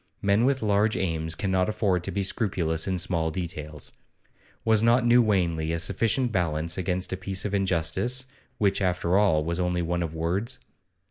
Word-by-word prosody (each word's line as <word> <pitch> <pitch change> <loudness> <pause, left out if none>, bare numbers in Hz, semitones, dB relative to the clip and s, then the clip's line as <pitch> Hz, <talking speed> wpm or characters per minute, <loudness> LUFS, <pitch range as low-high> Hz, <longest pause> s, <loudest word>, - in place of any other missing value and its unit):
Men 100 +4 +2
with 135 -2 +1
large 105 +1 +2
aims 80 -2 -2
cannot 95 0 0
afford 95 -5 0
to - - -3
be 100 - -1
scrupulous 90 -6 -1
in 95 -1 0
small 85 -2 0
details. 80 -4 -6 0.7
Was 110 -2 +4
not 120 +2 +4
New 120 +1 +6
Wanley 85 -7 +1
a - - 0
sufficient 115 +8 +1
balance 85 -3 -1
against 90 0 -1
a - - -2
piece 95 +1 -3
of 105 - -2
injustice, 95 +7 0 0.3
which, 100 -1 +1
after 90 -1 +1
all, 95 -7 +3
was 85 +1 -2
only 90 -1 0
one 85 +1 -1
of 80 -1 -4
words? 90 +10 -1
95 Hz, 175 wpm, -26 LUFS, 85-105 Hz, 0.7 s, New